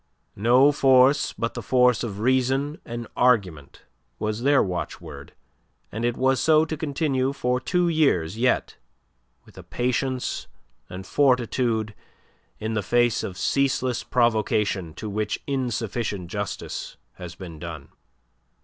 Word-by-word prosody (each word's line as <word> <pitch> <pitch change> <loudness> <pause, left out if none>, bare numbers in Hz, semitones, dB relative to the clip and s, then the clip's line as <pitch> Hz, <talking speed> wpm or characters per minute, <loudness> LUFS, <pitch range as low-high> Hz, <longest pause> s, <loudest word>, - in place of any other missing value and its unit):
"No 125 +6 +5
force 135 -1 +4
but 115 - -3
the - - -5
force 125 -2 +3
of 105 -4 -4
reason 130 +4 +1
and 120 0 -6
argument" 95 - +1 0.3
was 110 +1 -3
their 140 +1 +4
watchword, 80 -6 -6 0.6
and 110 +2 -4
it 120 0 0
was 130 0 +2
so 155 0 +4
to 155 - -4
continue 140 -3 -1
for 125 -2 0
two 175 +7 0
years 135 - +1
yet, 125 +3 0 0.7
with - - -15
a - - -10
patience 125 +1 -2 0.4
and 95 +1 -8
fortitude 120 -5 +1 0.6
in 110 +1 -4
the 110 - 0
face 120 +3 +2
of 90 - -6
ceaseless 130 -1 0
provocation 105 -7 0
to 110 - -6
which 105 +1 -2
insufficient 115 -8 -3
justice 105 -3 -5 0.2
has 90 -1 -8
been 85 -4 -9
done. 80 -4 -8
120 Hz, 130 wpm, -24 LUFS, 105-130 Hz, 0.7 s, No